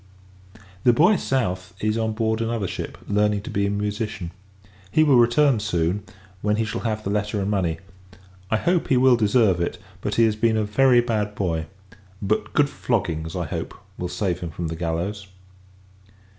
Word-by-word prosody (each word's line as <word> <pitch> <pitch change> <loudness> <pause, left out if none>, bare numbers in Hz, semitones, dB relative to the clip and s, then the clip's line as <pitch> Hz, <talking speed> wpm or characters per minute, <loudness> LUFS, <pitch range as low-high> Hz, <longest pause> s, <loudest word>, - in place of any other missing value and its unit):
The 120 - +6
boy, 175 - +5
South, 90 - -2
is 110 0 0
on 110 -1 -1
board 110 0 0
another 115 -3 -1
ship, - - -6
learning 105 0 +1
to - - -7
be 100 0 +1
a - - 0
musician. 105 -2 -3 0.6
He 155 - +4
will 140 -5 +5
return 120 +1 +4
soon, 90 -2 0 0.4
when 105 0 +1
he 110 +1 0
shall 110 - -4
have 110 -2 -2
the 100 - -2
letter 105 0 -1
and 100 +1 -1
money. 90 -5 0 0.7
I 110 - +2
hope, 175 +8 +1
he 130 - +3
will 130 0 +6
deserve 105 -5 +3
it; 85 - -2 0.2
but 105 - -2
he 115 - +4
has 110 -1 +1
been 110 +1 +2
a 110 - +1
very 125 +4 +4
bad 105 -3 -2
boy: 80 -4 -1 0.5
but 105 +2 -1
good 145 -1 +4
floggings, 90 - -2
I 90 -2 -2
hope, - - -5 0.2
will 90 - -4
save 90 -2 -1
him 85 - -5
from 80 +1 -4
the 80 - -4
gallows. 90 +5 -3
105 Hz, 185 wpm, -23 LUFS, 95-115 Hz, 0.7 s, The